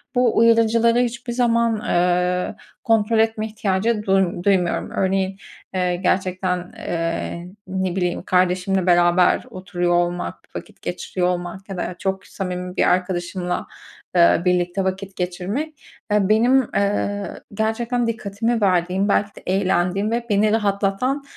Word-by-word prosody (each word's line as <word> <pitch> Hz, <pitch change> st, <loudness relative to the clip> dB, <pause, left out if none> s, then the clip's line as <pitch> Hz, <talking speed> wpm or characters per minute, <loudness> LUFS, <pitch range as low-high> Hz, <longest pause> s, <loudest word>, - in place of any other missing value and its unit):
bu 245 Hz, -2 st, +2 dB
uyarıcıları 230 Hz, +1 st, +4 dB
hiçbir 240 Hz, 0 st, -2 dB
zaman, 235 Hz, -2 st, +2 dB
ııı, 180 Hz, 0 st, +1 dB, 0.3 s
kontrol 225 Hz, -2 st, +2 dB
etme 220 Hz, -1 st, +1 dB
ihtiyacı 210 Hz, +1 st, -1 dB
duym 190 Hz, -3 st, +1 dB
duymuyorum. 185 Hz, -4 st, +1 dB
Örneğin, 190 Hz, 0 st, 0 dB, 0.4 s
eee, 180 Hz, -1 st, 0 dB
gerçekten, 185 Hz, -1 st, -1 dB
eee, 170 Hz, +1 st, -3 dB, 0.2 s
ne 190 Hz, -1 st, -2 dB
bileyim 180 Hz, -1 st, -1 dB
kardeşimle 185 Hz, +1 st, +1 dB
beraber 175 Hz, 0 st, +4 dB
oturuyor 180 Hz, -2 st, -2 dB
olmak, 175 Hz, 0 st, 0 dB, 0.2 s
vakit -, -, -9 dB
geçiriyor 180 Hz, -1 st, -2 dB
olmak 180 Hz, +2 st, -4 dB
ya 195 Hz, -, -5 dB
da, -, -, -1 dB
eee, 180 Hz, -, -5 dB
çok 190 Hz, -1 st, -3 dB
samimi 180 Hz, -1 st, -5 dB
bir -, -, +3 dB
arkadaşımla, 180 Hz, 0 st, -1 dB, 0.5 s
ııı, 170 Hz, +1 st, +5 dB
birlikte 180 Hz, +1 st, +1 dB
vakit 190 Hz, +1 st, -3 dB
geçirmek, 195 Hz, -, -4 dB, 0.3 s
aaa, 210 Hz, -1 st, +2 dB
benim, 230 Hz, +4 st, +4 dB, 0.2 s
ııı, 200 Hz, -1 st, -1 dB
gerçekten 230 Hz, +3 st, -1 dB
dikkatimi 225 Hz, +1 st, -1 dB
verdiğim, 185 Hz, +1 st, +2 dB
belki 205 Hz, +1 st, +1 dB
de -, -, -12 dB
eğlendiğim 190 Hz, +2 st, +1 dB
ve 235 Hz, 0 st, -1 dB
beni 210 Hz, +1 st, +3 dB
rahatlatan 210 Hz, +6 st, 0 dB
190 Hz, 130 wpm, -21 LUFS, 180-220 Hz, 0.5 s, ııı